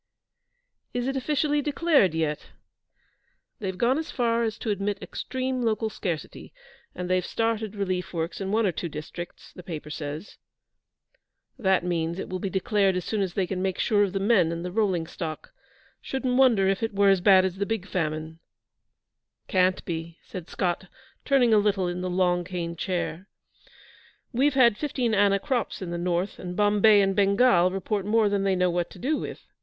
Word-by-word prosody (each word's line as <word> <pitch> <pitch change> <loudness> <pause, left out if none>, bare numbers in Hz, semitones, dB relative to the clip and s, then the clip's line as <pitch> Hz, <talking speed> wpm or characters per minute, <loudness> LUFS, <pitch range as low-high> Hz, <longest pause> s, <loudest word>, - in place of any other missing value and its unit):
'Is 245 +1 -1
it 270 - -1
officially 295 +2 +1
declared 290 - +2
yet?' 155 -2 -2 1.1
'They've 190 -3 -4
gone 255 +7 +2
as 320 - -5
far 235 -2 +1
as 225 -2 -1
to 220 - -2
admit 200 0 -1
extreme 260 +1 -3
local 220 -1 0
scarcity, 170 -8 -5 0.4
and 180 0 -4
they've 185 0 +1
started 225 0 -1
relief 185 -3 -2
works 170 +2 -3
in 195 0 -2
one 220 +1 +2
or 190 - +2
two 170 +1 -4
districts, 155 +3 -8
the - - -10
paper 155 -4 -7
says.' 150 +4 -6 1.2
'That 190 -5 +2
means 170 -1 -1
it - - -5
will 185 - -3
be 195 - -3
declared 195 +1 +1
as 180 - -2
soon 215 -2 -1
as 185 -3 -2
they 195 - +1
can 185 0 -3
make 190 -1 -1
sure 210 -3 +2
of 200 - 0
the 195 - 0
men 195 -5 +3
and 170 +1 -4
the 180 - -4
rolling 190 -5 +1
stock. 160 -2 -7 0.5
Shouldn't 260 -2 -2
wonder 240 -7 +4
if 195 +2 +1
it 225 -3 -2
were 200 0 +5
as 195 -2 +4
bad 190 -1 +6
as 190 0 -3
the 200 0 -1
Big 225 -4 -2
Famine.' 160 -2 -3 1.1
'Can't 185 -2 +2
be,' 165 -1 -5
said 180 -3 -8
Scott, 180 0 -2 0.4
turning 255 -5 +4
a 215 - +6
little 200 -3 +1
in 175 +1 -3
the 185 - -2
long 180 -1 +1
cane 170 -1 -4
chair. 180 +1 -3 1.1
'We've 270 +3 +2
had 235 -5 +5
fifteen 255 -6 -1
anna 200 -1 +4
crops 255 0 -2
in 180 -3 -5
the 170 - -3
north, 175 +2 -1
and 180 0 -6
Bombay 210 0 +5
and 195 0 +1
Bengal 200 -2 +4
report 195 +2 -2
more 215 +1 +3
than 200 -1 0
they 195 -1 +2
know 180 -1 +2
what 175 0 -1
to - - -13
do 295 +5 0
with. - - -7
195 Hz, 185 wpm, -26 LUFS, 175-225 Hz, 1.2 s, bad